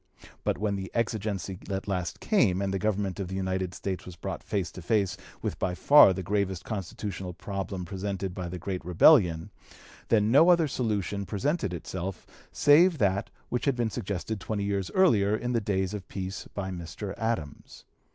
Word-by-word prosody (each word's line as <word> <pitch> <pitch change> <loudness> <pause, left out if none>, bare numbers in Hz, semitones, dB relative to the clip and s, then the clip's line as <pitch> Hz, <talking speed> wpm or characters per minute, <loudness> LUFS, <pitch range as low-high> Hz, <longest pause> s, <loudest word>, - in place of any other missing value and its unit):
But - - 0
when 100 0 -1
the 95 -1 -5
exigency 105 -5 -2
at 95 0 -3
last 90 -3 -2
came, 115 - +2
and 100 -1 -1
the 95 - -1
government 100 -2 -1
of 95 - -3
the 95 - -5
United 95 -1 -2
States 95 -2 -4
was 90 - -10
brought - - -5
face 95 -4 -2
to 90 - -9
face 100 +1 +1 0.3
with - - -3
by 90 -1 -1
far 145 -1 +7
the 95 0 -3
gravest 95 -1 -1
constitutional 95 -2 -5
problem 95 0 -5
presented 95 0 -4
by 90 -1 -5
the 90 - -5
great 90 +1 -4
rebellion, 90 - +5 0.6
then 110 -1 +3
no 155 +7 +7
other 170 -3 +5
solution 105 -6 -1
presented 105 - -1
itself 90 +2 -5 0.3
save 160 +4 +5
that 100 -3 +1 0.2
which 125 - -1
had 140 -3 +2
been 120 -2 -1
suggested 100 +2 -3
twenty 100 +1 -3
years 100 -2 -1
earlier 110 - +4
in 120 +2 -2
the 115 - +1
days 95 -1 -1
of 100 -3 -6
peace 95 0 -5
by 95 -2 -3
Mr. 90 +3 -6
Adams. 110 -10 -4
100 Hz, 180 wpm, -28 LUFS, 95-110 Hz, 0.6 s, far